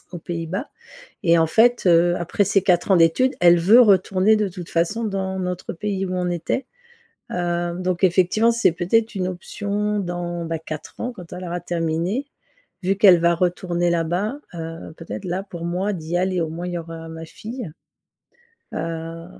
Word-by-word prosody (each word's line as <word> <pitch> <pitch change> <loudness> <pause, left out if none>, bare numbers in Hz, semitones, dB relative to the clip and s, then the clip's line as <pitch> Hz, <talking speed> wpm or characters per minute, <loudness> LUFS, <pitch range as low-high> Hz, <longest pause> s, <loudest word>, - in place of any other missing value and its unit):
aux 175 - -5
Pays-Bas 170 - -4 0.6
et 170 -1 +5
en 160 -1 +3
fait, 240 +7 +4
heu, 175 +1 +5
après 175 +4 0
ces 195 0 +2
4 180 +1 +2
ans 185 - +6
d'études 170 +11 +3
elle 175 0 +6
veut 205 +9 +6
retourner 195 -1 +4
de 210 -1 +1
toute 175 -1 -9
façon 205 +7 0
dans 190 -2 -2
notre 180 -1 -4
pays 195 +1 -2
où 185 - -4
on 180 -1 -1
était, 175 +10 -2 0.7
heu, 175 -1 -1
donc 185 0 0
effectivement 185 +5 +3
c'est 230 -7 +3
peut-être 220 +7 +1
une 185 -2 -1
option 205 +3 -2
dans, 175 -2 -4
bah 165 0 -3
4 155 -1 -8
ans 245 +1 -3
quand 175 -2 -11
elle 180 +1 -6
aura 175 0 -4
terminé, 175 - -2 0.6
vu 190 +2 +1
qu'elle 190 -4 +7
va 170 0 +3
retourner 175 0 0
là-bas, 175 - -1 0.2
heu, 165 -1 -7
peut-être 170 +3 -7
là 180 +2 -2
pour 170 -4 -8
moi 185 +4 -1
d'y 170 -1 -3
aller 185 0 0
au 160 - -1
moins 170 +3 -5
il - - -5
y - - -1
aura 165 0 -8
ma 165 0 -8
fille. 225 0 -7 1.0
Heu, 165 0 -5
175 Hz, 180 wpm, -22 LUFS, 170-195 Hz, 1.0 s, qu'elle